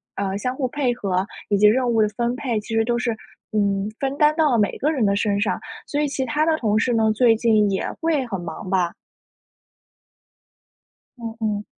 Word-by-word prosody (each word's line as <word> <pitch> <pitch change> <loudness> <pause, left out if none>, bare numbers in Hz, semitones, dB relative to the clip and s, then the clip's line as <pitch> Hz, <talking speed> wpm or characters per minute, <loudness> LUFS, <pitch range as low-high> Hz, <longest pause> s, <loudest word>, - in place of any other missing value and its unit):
呃， 195 0 -2
相 250 +4 -3
互 260 -1 -1
配 250 -2 0
合 190 -5 -1 0.2
以 205 - +3
及 210 +1 +6
任 245 +3 +3
务 225 -2 +3
的 215 - +3
分 235 +3 -2
配， 250 -5 -2
其 220 +2 -5
实 225 - +3
都 240 +1 0
是， 245 -1 0 0.4
嗯， 200 -1 0
分 275 0 -2
担 300 +1 +4
到 310 -3 +3
了 240 - +3
每 205 -2 +2
一 - - -9
个 300 +4 +1
人 265 -8 +1
的 200 0 +2
身 200 -1 0
上。 205 - 0 0.3
所 290 - -1
以 300 - +1
其 270 -1 -2
他 295 +6 +1
的 320 -1 +2
同 215 -6 +1
事 240 +2 +1
呢， 220 -1 +3
最 230 0 +4
近 215 -2 +3
也 190 - -1
会 320 -5 +1
很 195 -5 -4
忙 175 +2 -7
吧？ 180 -2 +1 2.2
嗯 230 -2 -6
嗯。 210 -2 -1
225 Hz, 230 characters per minute, -22 LUFS, 205-260 Hz, 2.2 s, 及